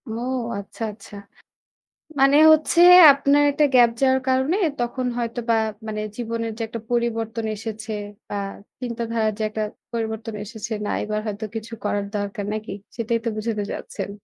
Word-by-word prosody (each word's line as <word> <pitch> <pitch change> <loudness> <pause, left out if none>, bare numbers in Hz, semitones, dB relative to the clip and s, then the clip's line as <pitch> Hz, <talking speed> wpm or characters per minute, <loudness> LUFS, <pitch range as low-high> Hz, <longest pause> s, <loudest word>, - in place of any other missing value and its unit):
ও - - -4 0.4
আচ্ছা, 200 +3 -8
আচ্ছা। 210 0 -13 1.0
মানে 275 +2 +6
হচ্ছে 315 +2 +3 0.3
আপনার 280 +1 +3
একটা 295 +1 +3
গ্যাপ 240 -1 +7
যাওয়ার 265 -1 +4
কারণে 265 +7 +2 0.2
তখন 240 +1 -2
হয়তোবা 235 -1 -1 0.3
মানে 215 0 -3 0.2
জীবনের 230 -1 -3
যে - - -6
একটা 230 +1 -6
পরিবর্তন 230 -1 -1
এসেছে, 220 +1 -6 0.4
বা - - -4 0.5
চিন্তাধারার 230 -2 -1
যে 220 - -2
একটা 215 0 -3 0.3
পরিবর্তন 220 -1 -3
এসেছে 220 +1 -8
না - - -2
এবার 215 0 -2
হয়তো 210 +1 -4
কিছু 225 +1 -6
করার 205 -1 -1
দরকার 205 0 -4
নাকি? 215 -2 -5 0.2
সেটাই 230 0 -1
তো - - +1
বুঝাতে 215 -1 -2
যাচ্ছেন। - - -6
230 Hz, 145 wpm, -23 LUFS, 215-240 Hz, 1.0 s, গ্যাপ